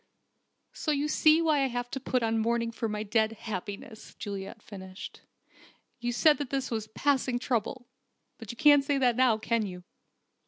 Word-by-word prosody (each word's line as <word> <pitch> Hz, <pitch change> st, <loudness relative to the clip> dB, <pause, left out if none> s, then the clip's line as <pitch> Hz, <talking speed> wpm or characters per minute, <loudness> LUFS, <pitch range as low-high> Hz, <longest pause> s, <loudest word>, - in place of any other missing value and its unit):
"So -, -, -4 dB
you 295 Hz, 0 st, +1 dB
see 310 Hz, +1 st, +4 dB
why 310 Hz, -3 st, +3 dB
I 270 Hz, -, +2 dB
wanted 245 Hz, -1 st, -4 dB
to 270 Hz, -, -3 dB
put 255 Hz, -2 st, -1 dB
on 225 Hz, 0 st, +1 dB
mourning 230 Hz, +1 st, 0 dB
for 230 Hz, -1 st, -3 dB
my 210 Hz, 0 st, -3 dB
dead 220 Hz, +1 st, +1 dB
happiness," 215 Hz, 0 st, -7 dB
Juliet 200 Hz, +1 st, -7 dB
finished. 190 Hz, -2 st, -9 dB, 0.8 s
"You 240 Hz, 0 st, -2 dB
said 295 Hz, +5 st, +4 dB
this 270 Hz, -2 st, -2 dB
was 220 Hz, -2 st, -2 dB
a -, -, -33 dB
'passing 260 Hz, 0 st, +1 dB
trouble.' 245 Hz, 0 st, -2 dB, 0.5 s
But 225 Hz, -3 st, -10 dB
you 235 Hz, -, -6 dB
can't 290 Hz, 0 st, +6 dB
say 280 Hz, 0 st, 0 dB
that 250 Hz, -3 st, +3 dB
now, 250 Hz, -3 st, +4 dB
can 230 Hz, +1 st, 0 dB
you?" 180 Hz, -3 st, -7 dB
235 Hz, 180 wpm, -29 LUFS, 220-270 Hz, 0.8 s, can't